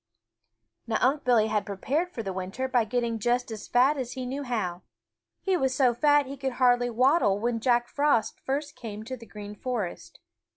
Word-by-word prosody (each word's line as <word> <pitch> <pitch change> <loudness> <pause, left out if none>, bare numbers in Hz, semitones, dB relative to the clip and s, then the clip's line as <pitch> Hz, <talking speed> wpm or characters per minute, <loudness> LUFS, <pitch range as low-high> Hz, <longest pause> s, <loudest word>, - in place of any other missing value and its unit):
Now 220 -1 +1
Unc' 275 +4 +2
Billy 235 -4 +4
had 210 -1 0
prepared 275 - -2
for 235 -10 -6
the 195 -2 -4
winter 190 +8 -3
by 245 -3 +2
getting 235 0 -1
just 245 +2 0
as 215 -2 -7
fat 260 +5 +3
as 250 -2 -4
he 255 -1 -5
knew 270 +3 -4
how. 210 -9 -2 0.6
He 385 -1 +2
was 265 -5 +1
so 255 -4 +4
fat 290 +4 +4
that 265 - -12
he 280 - -7
could 265 -1 -2
hardly 245 -1 +3
waddle 245 - +3
when 230 +1 -1
Jack 240 0 +2
Frost 285 -6 +1
first 285 +2 -3
came 215 -2 -7
to 260 +4 -5
the 230 -2 -13
Green 205 -1 -8
Forest. 215 -4 -5
245 Hz, 200 wpm, -27 LUFS, 220-265 Hz, 0.6 s, Billy